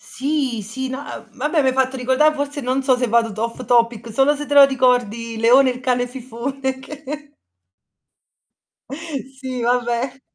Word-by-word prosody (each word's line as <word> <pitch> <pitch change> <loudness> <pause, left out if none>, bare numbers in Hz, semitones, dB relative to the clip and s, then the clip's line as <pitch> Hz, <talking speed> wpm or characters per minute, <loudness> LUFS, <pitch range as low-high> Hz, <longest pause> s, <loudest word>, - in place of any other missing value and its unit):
Sì, 270 -4 -2
sì, 260 +6 -5
no, 260 +1 -4
uhm, 230 -6 -10
vabbè 300 +4 +1
m'hai 265 -1 +2
fatto 265 0 +1
ricordà 260 +5 +3
forse 285 0 -4
non 260 +1 0
so 260 -1 +3
se 250 0 0
vado 230 0 +2
t 205 - -12
off 230 +2 -3
topic, 235 -1 +1
solo 270 +6 +3
se 295 +1 -6
te 290 - -2
lo 280 -1 +10
ricordi 245 -4 0
Leone 250 +4 +5
il 250 0 -4
cane 250 -1 0
fifone 260 +2 -5
che 295 +1 -9 1.9
Sì, 260 -1 -7
vabbè. 245 +2 -1
260 Hz, 160 wpm, -20 LUFS, 240-275 Hz, 1.9 s, lo